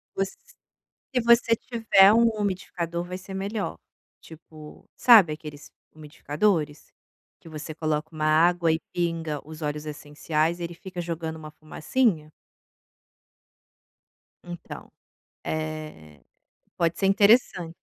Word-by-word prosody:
Você 195 0 -2 0.8
se 250 - +3
você 235 0 +4
tiver 220 -5 +4
um 230 +1 +5
umidificador 180 -4 -3
vai 180 +1 -6
ser 190 +1 -11
melhor, 200 +2 -4 0.4
tipo, 155 -1 -14
sabe 215 -10 +7
aqueles 150 -1 -10 0.2
umidificadores? 150 +1 -2 0.5
Que - - -17
você 155 0 -7
coloca 155 0 -2
uma 155 -1 -3
água 165 +2 +3
e 160 - 0
pinga 165 -3 -2
os 155 0 -10
óleos 150 0 -4
essenciais 155 +2 -2
ele 170 0 -5
fica 180 +1 -9
jogando 165 -1 -5
uma 155 -1 -10
fumacinha? 155 +2 -1 2.1
Então, 175 -1 -10 0.5
eh, 155 - -6 0.6
pode 170 -1 0
ser 195 - +1
interessante. 195 -4 +3
165 Hz, 110 wpm, -25 LUFS, 155-190 Hz, 2.1 s, sabe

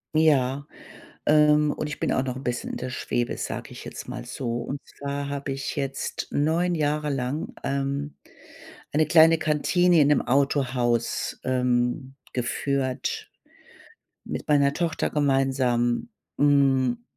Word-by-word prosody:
Ja, 140 -3 +3 0.6
ähm, 150 0 +5
und - - -3
ich 150 - -6
bin - - 0
auch 130 - +1
noch 130 -1 -3
'n 130 - -7
bisschen 125 -2 -3
in - - -4
der 130 - -4
Schwebe, 120 -1 -2
sage - - -5
ich - - -10
jetzt - - -8
mal - - -6
so. 120 -2 -4
Und 140 +4 -4
zwar 140 0 -5
habe 140 0 -4
ich 135 0 -4
jetzt 135 -1 -3
9 165 +5 +1
Jahre 150 -1 0
lang, 135 +3 -3
ähm, 140 +1 -2 0.8
eine 155 +1 +3
kleine 165 +1 +6
Kantine 170 +3 +3
in 145 - +5
'nem 150 - +4
Autohaus, 125 -3 0
ähm, 125 +1 0 0.2
geführt 130 +1 -2 0.9
mit - - -6
meiner 140 -2 +4
Tochter 170 -1 -1
gemeinsam. 135 - +1 0.3
Hm, 140 - +3
140 Hz, 135 wpm, -25 LUFS, 130-150 Hz, 0.9 s, kleine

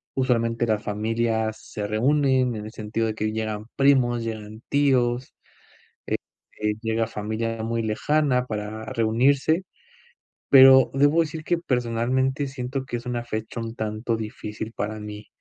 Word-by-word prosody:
usualmente 115 -3 +1
las 110 -1 0
familias 110 +1 -1
se 105 -1 -5
reúnen, 130 +2 +2
en 105 -1 -6
el 110 - -7
sentido 110 +1 -2
de 110 - -3
que 110 0 -1
llegan 110 -1 -3
primos, 130 -4 +3
llegan 110 -1 -6
tíos, 130 -3 +2 0.7
eh, - - 0 0.4
eh, 105 0 +1
llega 115 0 0
familia 110 +1 -3
muy 115 +1 -1
lejana 125 +4 +1
para 110 -1 -5
reunirse. 130 +10 +2 0.9
Pero 130 -1 +8
debo 145 +4 +4
decir 155 0 -6
que, 175 +1 +1
personalmente, 130 0 0
siento 130 0 -4
que 120 - -3
es 120 - -11
una 120 -1 -2
fecha 110 0 -5
un 115 0 -5
tanto 110 +2 -2
difícil 110 0 -6
para 110 +1 -3
mí. 105 0 -8
115 Hz, 145 wpm, -24 LUFS, 110-130 Hz, 0.9 s, Pero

